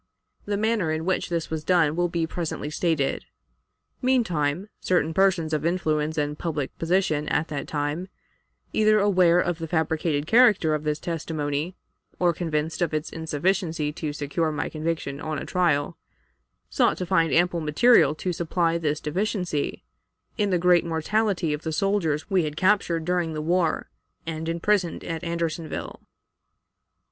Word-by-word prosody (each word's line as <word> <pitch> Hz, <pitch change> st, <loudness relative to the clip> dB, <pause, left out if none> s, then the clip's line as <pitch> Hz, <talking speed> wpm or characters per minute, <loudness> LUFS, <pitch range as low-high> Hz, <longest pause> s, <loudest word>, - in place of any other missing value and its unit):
The 205 Hz, 0 st, -1 dB
manner 215 Hz, -6 st, +1 dB
in 160 Hz, +1 st, -2 dB
which 185 Hz, 0 st, 0 dB
this 170 Hz, -2 st, -2 dB
was 160 Hz, -1 st, -3 dB
done 160 Hz, -3 st, +3 dB
will 175 Hz, +1 st, +1 dB
be 170 Hz, -1 st, -1 dB
presently 160 Hz, -2 st, -4 dB
stated. 155 Hz, -4 st, 0 dB, 0.8 s
Meantime, 185 Hz, -, +1 dB
certain 165 Hz, -3 st, +1 dB
persons 175 Hz, -4 st, +2 dB
of 150 Hz, -1 st, 0 dB
influence 160 Hz, -3 st, 0 dB
and 150 Hz, 0 st, -1 dB
public 150 Hz, -5 st, -3 dB
position 165 Hz, -3 st, +1 dB
at 155 Hz, +2 st, 0 dB
that 145 Hz, -2 st, -4 dB
time, 150 Hz, +4 st, -2 dB, 0.7 s
either 215 Hz, 0 st, +4 dB
aware 185 Hz, -4 st, +4 dB
of 175 Hz, -2 st, -1 dB
the 165 Hz, -, -4 dB
fabricated 160 Hz, -2 st, 0 dB
character 215 Hz, -7 st, +5 dB
of 150 Hz, 0 st, -2 dB
this 150 Hz, 0 st, 0 dB
testimony 155 Hz, 0 st, -3 dB, 0.4 s
or 175 Hz, -1 st, +2 dB
convinced 160 Hz, -1 st, -2 dB
of 170 Hz, -3 st, +1 dB
its 155 Hz, +1 st, -3 dB
insufficiency 160 Hz, 0 st, -1 dB
to 155 Hz, -1 st, -4 dB
secure 150 Hz, +2 st, -1 dB
my 150 Hz, -, -2 dB
conviction 155 Hz, -3 st, -3 dB
on 155 Hz, -1 st, -3 dB
a -, -, -5 dB
trial, 170 Hz, -4 st, 0 dB, 0.7 s
sought -, -, +2 dB
to 180 Hz, -, -3 dB
find 165 Hz, -3 st, +2 dB
ample 175 Hz, 0 st, +2 dB
material 155 Hz, -, +4 dB
to 180 Hz, +3 st, -3 dB
supply 170 Hz, 0 st, 0 dB
this 150 Hz, -2 st, -1 dB
deficiency, 180 Hz, -2 st, -2 dB, 0.5 s
in 205 Hz, -2 st, 0 dB
the 185 Hz, -, +2 dB
great 175 Hz, 0 st, +4 dB
mortality 170 Hz, +1 st, 0 dB
of 150 Hz, -, -4 dB
the 160 Hz, -, -3 dB
soldiers 160 Hz, -3 st, 0 dB
we 190 Hz, -3 st, +2 dB
had 150 Hz, -1 st, -4 dB
captured 185 Hz, -4 st, +2 dB
during 175 Hz, -2 st, 0 dB
the 155 Hz, -, -3 dB
war 170 Hz, +1 st, 0 dB, 0.3 s
and 160 Hz, 0 st, -4 dB
imprisoned 175 Hz, +1 st, 0 dB
at 165 Hz, +1 st, -4 dB
Andersonville. 170 Hz, -1 st, -4 dB
165 Hz, 155 wpm, -25 LUFS, 155-180 Hz, 0.8 s, character